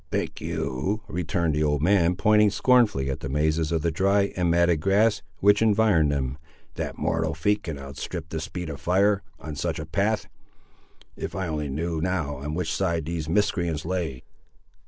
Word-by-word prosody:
"Think - - -3
you," 95 +12 -2
returned 85 -3 -1
the 75 - 0
old 75 -1 +1
man, 90 -1 +3
pointing 105 +2 +4
scornfully 105 - +3
at 65 - -4
the 70 - -5
mazes 75 +2 +1
of 80 -2 0
the 85 - +1
dry 100 +4 +2
and 90 -2 +1
matted 85 -1 +3
grass 100 +2 +3 0.2
which 105 +2 +5
environed 105 -8 +4
them, 70 -1 -2 0.3
"that - - -5
mortal 80 -1 -1
feet 105 +6 +1
can 80 -6 -5
outstrip 70 +4 -6
the 80 - -3
speed 85 +1 -5
of 70 - -8
fire, 100 +5 +3 0.2
on 75 0 -7
such - - -2
a 75 - -5
path! 100 +6 0 0.9
If - - -5
I 95 -1 -2
only 75 -3 -3
knew 80 +3 -2
now 80 -6 -1
on 75 +3 -4
which 90 -1 -2
side 85 -5 0
these 80 -1 -4
miscreants 85 -5 0
lay!" 85 -8 -3
85 Hz, 180 wpm, -25 LUFS, 75-100 Hz, 0.9 s, which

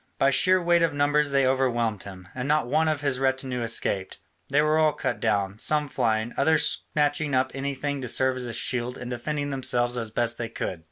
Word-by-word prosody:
By 135 - +3
sheer 185 +6 +4
weight 175 -1 +2
of 165 -3 +1
numbers 145 +1 +2
they 140 -1 +2
overwhelmed 120 -5 0
him: 95 -2 -11
and 130 +1 -4
not 150 -1 +2
one 155 +6 +1
of 155 -2 -1
his 140 -3 -1
retinue 130 -2 -1
escaped, 100 -4 -1 0.3
they 140 - +2
were 155 +1 +2
all 155 -1 +3
cut - - -3
down, 100 -2 -1
some 150 +3 +1
flying, 115 -4 -1
others 155 +2 +3
snatching 145 -1 0
up 130 +1 +1
anything 140 +1 -4
to 125 - -5
serve 130 +2 +2
as 125 - -3
a 120 - -6
shield 125 +2 -2
and 120 0 -7
defending 145 +4 -3
themselves 125 -2 +1
as 115 -2 -2
best 115 +1 -1
they 115 -1 -4
could. 95 -6 -5
130 Hz, 210 wpm, -25 LUFS, 120-145 Hz, 0.3 s, sheer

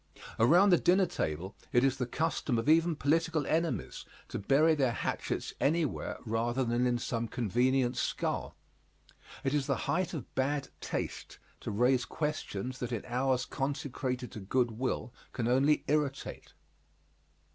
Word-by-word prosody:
Around 175 - +6
the 175 - +6
dinner 185 +2 +4
table 85 - -3 0.2
it 120 - +4
is 135 -2 +2
the 125 - -2
custom 155 -3 -1
of 115 - -2
even 165 +1 +4
political 160 +1 +1
enemies 165 +2 -1 0.3
to - - -4
bury 145 +10 +4
their 135 -6 +1
hatchets - - -3
anywhere 155 -1 0
rather 120 +3 0
than 120 +1 +1
in 120 -1 +1
some 115 -1 -2
convenient 125 +3 +1
skull. - - -2 0.9
It 135 0 0
is 145 -2 +1
the - - +2
height 185 -1 0
of 150 - -7
bad 140 +1 0
taste - - -4 0.2
to - - -5
raise 125 +4 +2
questions 130 -5 -3
that 125 0 -3
in 115 -4 -3
hours 125 +1 0
consecrated 130 -2 -3
to - - -7
good 120 +5 +1
will 125 +1 -3 0.2
can 115 - -1
only 135 +5 +3
irritate. 145 -2 -2
130 Hz, 145 wpm, -31 LUFS, 120-150 Hz, 0.9 s, Around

